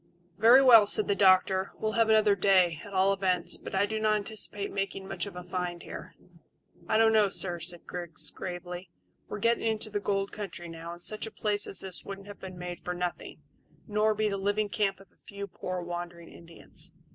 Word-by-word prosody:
"Very 245 Hz, +4 st, +8 dB
well," 230 Hz, -5 st, +8 dB
said 210 Hz, -, +1 dB
the 200 Hz, -, +3 dB
doctor; 190 Hz, -1 st, +4 dB
"we'll 215 Hz, -, -1 dB
have 225 Hz, 0 st, +2 dB
another 215 Hz, -1 st, +5 dB
day, 180 Hz, -4 st, +3 dB
at 205 Hz, -, -10 dB
all 195 Hz, 0 st, +3 dB
events; 185 Hz, -3 st, +1 dB
but -, -, -7 dB
I 195 Hz, +1 st, +3 dB
do 220 Hz, +1 st, -3 dB
not 215 Hz, 0 st, +3 dB
anticipate 205 Hz, -1 st, -3 dB
making 195 Hz, -1 st, -3 dB
much 200 Hz, -, -3 dB
of 200 Hz, -, -9 dB
a 180 Hz, -, -7 dB
find 180 Hz, -1 st, -4 dB
here." -, -, -9 dB, 0.7 s
"I 220 Hz, -, +3 dB
don't 225 Hz, 0 st, +5 dB
know, 210 Hz, -2 st, +4 dB
sir," 175 Hz, -2 st, +1 dB
said 170 Hz, +1 st, -4 dB
Griggs 175 Hz, -3 st, -5 dB
gravely. 175 Hz, 0 st, -7 dB, 0.4 s
"We're -, -, -5 dB
getting 230 Hz, +2 st, +1 dB
into 215 Hz, -1 st, -1 dB
the 205 Hz, -, -1 dB
gold 200 Hz, -1 st, -1 dB
country 195 Hz, -4 st, -7 dB
now, 165 Hz, +1 st, -8 dB
and 175 Hz, -, -10 dB
such 215 Hz, +1 st, -1 dB
a -, -, -8 dB
place 210 Hz, -1 st, -1 dB
as 190 Hz, -, -2 dB
this 190 Hz, -2 st, -4 dB
wouldn't 195 Hz, 0 st, -8 dB
have 205 Hz, 0 st, -11 dB
been 185 Hz, -1 st, -9 dB
made 175 Hz, 0 st, -6 dB
for 180 Hz, -, -4 dB
nothing, 180 Hz, 0 st, -5 dB, 0.4 s
nor 215 Hz, 0 st, +2 dB
be 215 Hz, +1 st, +1 dB
the 200 Hz, -1 st, -1 dB
living 205 Hz, +2 st, 0 dB
camp 200 Hz, -2 st, 0 dB
of 195 Hz, -, -18 dB
a -, -, -33 dB
few 200 Hz, 0 st, -7 dB
poor 185 Hz, -2 st, -5 dB
wandering 175 Hz, -1 st, -6 dB
Indians. 170 Hz, 0 st, -8 dB
195 Hz, 210 wpm, -29 LUFS, 180-210 Hz, 0.7 s, Very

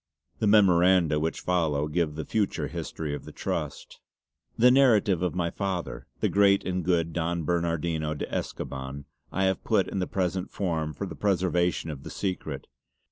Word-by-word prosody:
'" 70 Hz, -, -42 dB
The 110 Hz, -, +1 dB
memoranda 90 Hz, -6 st, +5 dB
which 80 Hz, +2 st, -2 dB
follow 80 Hz, -5 st, +1 dB
give 75 Hz, -1 st, -1 dB
the 80 Hz, -1 st, -4 dB
future 105 Hz, -3 st, 0 dB
history 75 Hz, -3 st, -5 dB
of 75 Hz, -, -5 dB
the -, -, -10 dB
Trust: -, -, -4 dB, 0.6 s
"The 125 Hz, +2 st, +6 dB
narrative 110 Hz, -9 st, +4 dB
of 90 Hz, -1 st, -1 dB
my 85 Hz, -2 st, 0 dB
father, 95 Hz, -3 st, -4 dB
the -, -, +3 dB
great 100 Hz, -1 st, +4 dB
and 90 Hz, 0 st, -1 dB
good 85 Hz, -2 st, +1 dB
Don 85 Hz, 0 st, -1 dB
Bernardino 85 Hz, -2 st, -1 dB
de -, -, -3 dB
Escoban, 65 Hz, +1 st, -5 dB, 0.3 s
I 95 Hz, -, 0 dB
have 95 Hz, -1 st, +1 dB
put 105 Hz, -4 st, +2 dB
in 100 Hz, -, -3 dB
the 90 Hz, -, -1 dB
present 95 Hz, 0 st, -1 dB
form 80 Hz, -6 st, -2 dB
for -, -, -4 dB
the -, -, -7 dB
preservation 90 Hz, -4 st, 0 dB
of 70 Hz, -3 st, -8 dB
the -, -, -8 dB
secret. 80 Hz, -8 st, -4 dB
85 Hz, 175 wpm, -27 LUFS, 80-95 Hz, 0.6 s, The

